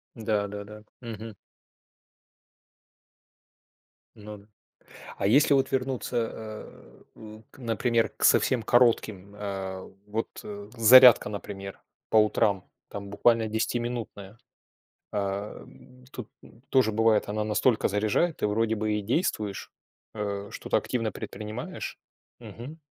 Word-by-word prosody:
Да-да-да. 105 Hz, -1 st, -3 dB, 0.2 s
Мгм. 115 Hz, -2 st, -8 dB, 2.8 s
Ну 105 Hz, 0 st, -10 dB
да. 100 Hz, 0 st, -19 dB, 0.7 s
А -, -, 0 dB
если 140 Hz, +6 st, +5 dB
вот 135 Hz, -1 st, +2 dB
вернуться, 125 Hz, -3 st, -1 dB
а, 110 Hz, -, -11 dB
н 110 Hz, 0 st, -12 dB
к, -, -, -19 dB
например, 115 Hz, -1 st, 0 dB
к -, -, -5 dB
совсем 125 Hz, -3 st, +4 dB
коротким, 110 Hz, -5 st, +2 dB
а, 95 Hz, -2 st, -5 dB, 0.2 s
вот, 110 Hz, +2 st, -2 dB, 0.2 s
э, 205 Hz, -1 st, -8 dB
зарядка, 125 Hz, 0 st, +8 dB
например, 100 Hz, -1 st, -7 dB, 0.3 s
по 110 Hz, -, +3 dB
утрам, 105 Hz, -3 st, +2 dB, 0.2 s
там 100 Hz, -1 st, -7 dB
буквально 110 Hz, +2 st, +2 dB
десятиминутная. 110 Hz, -2 st, -3 dB, 0.7 s
Ам, 100 Hz, -, -6 dB
тут, 120 Hz, -5 st, -8 dB
ну, 115 Hz, -, -18 dB
тоже 130 Hz, -5 st, +3 dB
бывает, 110 Hz, 0 st, +2 dB
она 105 Hz, +1 st, -1 dB
настолько 110 Hz, +2 st, +2 dB
заряжает. 110 Hz, -, 0 dB
Ты -, -, 0 dB
вроде 110 Hz, +2 st, 0 dB
бы 110 Hz, 0 st, -1 dB
и 105 Hz, -, -1 dB
действуешь, 105 Hz, -, -2 dB, 0.4 s
э, 100 Hz, -1 st, -4 dB
что-то -, -, -1 dB
активно 115 Hz, -3 st, -2 dB
предпринимаешь? 110 Hz, +3 st, -7 dB, 0.4 s
Мгм. 140 Hz, +8 st, -10 dB
110 Hz, 115 wpm, -27 LUFS, 105-120 Hz, 2.8 s, зарядка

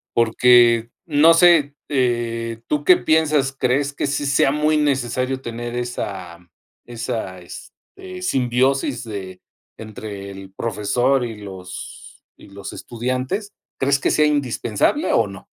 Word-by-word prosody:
porque 115 Hz, 0 st, +4 dB, 0.2 s
no 160 Hz, +1 st, +5 dB
sé, 165 Hz, -5 st, +5 dB
eh, 115 Hz, -3 st, -1 dB
¿tú 150 Hz, -1 st, -1 dB
qué 180 Hz, -, +7 dB
piensas? 155 Hz, -4 st, +2 dB
¿Crees 140 Hz, +2 st, 0 dB
que 140 Hz, -, -2 dB
sí 145 Hz, +1 st, -2 dB
sea 140 Hz, -1 st, +3 dB
muy 150 Hz, +1 st, +1 dB
necesario 130 Hz, -2 st, 0 dB
tener 120 Hz, 0 st, -6 dB
esa 95 Hz, -8 st, -5 dB, 0.5 s
esa, 115 Hz, -5 st, -5 dB
este, 85 Hz, -, -11 dB, 0.5 s
simbiosis 130 Hz, -2 st, 0 dB, 0.7 s
entre 105 Hz, -2 st, -8 dB
el 95 Hz, 0 st, -11 dB
profesor 120 Hz, +5 st, 0 dB
y 115 Hz, -3 st, -7 dB
los 95 Hz, -3 st, -10 dB
y -, -, -16 dB
los 100 Hz, 0 st, -8 dB
estudiantes? 130 Hz, -, -4 dB, 0.3 s
¿Crees 140 Hz, +1 st, +2 dB
que -, -, +1 dB
sea 150 Hz, -, +3 dB
indispensable, 140 Hz, -, 0 dB
o 115 Hz, -, +3 dB
no? 95 Hz, -1 st, -11 dB
125 Hz, 125 wpm, -21 LUFS, 115-140 Hz, 0.7 s, qué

